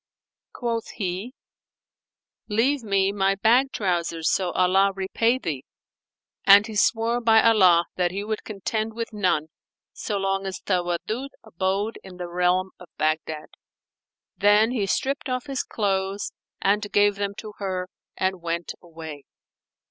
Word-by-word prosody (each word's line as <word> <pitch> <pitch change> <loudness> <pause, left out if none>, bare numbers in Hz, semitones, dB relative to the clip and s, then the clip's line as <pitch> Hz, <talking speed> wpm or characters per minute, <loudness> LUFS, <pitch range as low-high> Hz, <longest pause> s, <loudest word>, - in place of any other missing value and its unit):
Quoth 230 -2 -3
he, 200 +5 -4 1.1
"Leave 250 +7 +2
me 195 -3 +1
my 195 -1 +1
bag 245 +7 +3
trousers, 170 -4 0
so 185 -2 +1
Allah 190 +2 +3
repay 225 +5 +1
thee;" 150 - -4 0.8
and 200 +1 +8
he 220 -1 -7
swore 230 +3 +2
by 225 -1 +5
Allah 185 -7 +5
that 180 -1 +2
he 195 +3 -4
would 215 0 -3
contend 215 +2 -3
with 230 -1 -4
none, 180 -7 0 0.4
so 210 - -3
long 195 0 -1
as 190 -2 -5
Tawaddud 185 +8 -2
abode 200 +2 -2
in 185 -2 -11
the 180 -1 -5
realm 180 +2 +1
of 180 - -12
Baghdad. 155 0 -1 0.9
Then 210 +3 +4
he 215 -6 -1
stripped 275 +7 -1
off 255 -1 -2
his 275 -2 -2
clothes 195 -1 -2 0.3
and 205 +1 +1
gave 205 0 +3
them 200 0 -2
to 210 +1 -8
her 185 -2 -3 0.3
and 190 -1 -1
went 170 0 -3
away. 160 -4 -10
195 Hz, 140 wpm, -24 LUFS, 180-220 Hz, 1.1 s, and